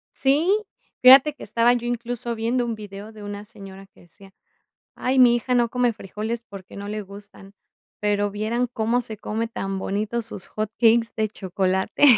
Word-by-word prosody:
Sí, 290 Hz, +7 st, +2 dB, 0.5 s
fíjate 265 Hz, +3 st, +8 dB
que -, -, -12 dB
estaba 235 Hz, +1 st, +3 dB
yo 240 Hz, 0 st, -2 dB
incluso 240 Hz, 0 st, -3 dB
viendo 235 Hz, +2 st, 0 dB
un 230 Hz, -1 st, -3 dB
video 205 Hz, 0 st, -9 dB
de 215 Hz, -1 st, -12 dB
una 205 Hz, 0 st, -7 dB
señora 195 Hz, -3 st, -12 dB
que -, -, -23 dB
decía: 195 Hz, +3 st, -18 dB, 0.6 s
"Ay, 260 Hz, +1 st, 0 dB
mi 240 Hz, -1 st, +7 dB
hija 250 Hz, +1 st, 0 dB
no 240 Hz, -1 st, +3 dB
come 245 Hz, -1 st, +1 dB
frijoles, 220 Hz, +3 st, -5 dB
porque, 200 Hz, -5 st, -12 dB
no 200 Hz, 0 st, -7 dB
le 210 Hz, +1 st, -4 dB
gustan, 200 Hz, 0 st, -12 dB, 0.5 s
pero, 205 Hz, 0 st, 0 dB
vieran 220 Hz, +4 st, -1 dB
cómo 235 Hz, +1 st, 0 dB
se 220 Hz, -2 st, -6 dB
come 220 Hz, +2 st, -3 dB
tan 195 Hz, -4 st, -4 dB
bonito 215 Hz, +5 st, -2 dB
sus 210 Hz, -, -4 dB
hot 215 Hz, -1 st, -3 dB
cakes 230 Hz, 0 st, +4 dB
de 220 Hz, -1 st, 0 dB
chocolate." 190 Hz, +2 st, -1 dB
220 Hz, 175 wpm, -23 LUFS, 205-240 Hz, 0.6 s, fíjate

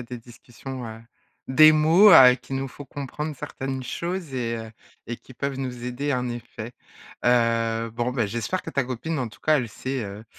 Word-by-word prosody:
a -, -, -5 dB
des 120 Hz, +1 st, -8 dB
discussions, 120 Hz, +2 st, -10 dB
heu, 110 Hz, 0 st, -9 dB, 0.5 s
des 155 Hz, +4 st, +8 dB
mots, 165 Hz, +7 st, +6 dB
heu, 130 Hz, -5 st, +9 dB
qui 130 Hz, -, -13 dB
nous 135 Hz, 0 st, -2 dB
font 145 Hz, +2 st, -11 dB
comprendre 145 Hz, +3 st, -5 dB
certaines 135 Hz, 0 st, -5 dB
choses 170 Hz, +4 st, -4 dB
et 115 Hz, -2 st, -2 dB
heu 110 Hz, -1 st, -7 dB, 0.4 s
et 120 Hz, +1 st, -4 dB
qui 130 Hz, -, -16 dB
peuvent 140 Hz, 0 st, -3 dB
nous 125 Hz, -2 st, -5 dB
aider 135 Hz, +4 st, -2 dB
en 125 Hz, 0 st, -2 dB
effet. 120 Hz, -1 st, -7 dB, 0.5 s
Heu, 115 Hz, -1 st, +2 dB
bon 120 Hz, +2 st, -2 dB
bah, 120 Hz, -4 st, 0 dB
j'espère 120 Hz, -, -3 dB
que 165 Hz, -, -7 dB
ta 140 Hz, -4 st, 0 dB
copine 130 Hz, +6 st, -4 dB
en 125 Hz, -3 st, -2 dB
tout 115 Hz, -, -17 dB
cas, 155 Hz, -1 st, +3 dB
elle 120 Hz, -3 st, -3 dB
sait, 130 Hz, +3 st, -4 dB
heu 100 Hz, +2 st, -8 dB
125 Hz, 200 wpm, -24 LUFS, 115-140 Hz, 0.5 s, heu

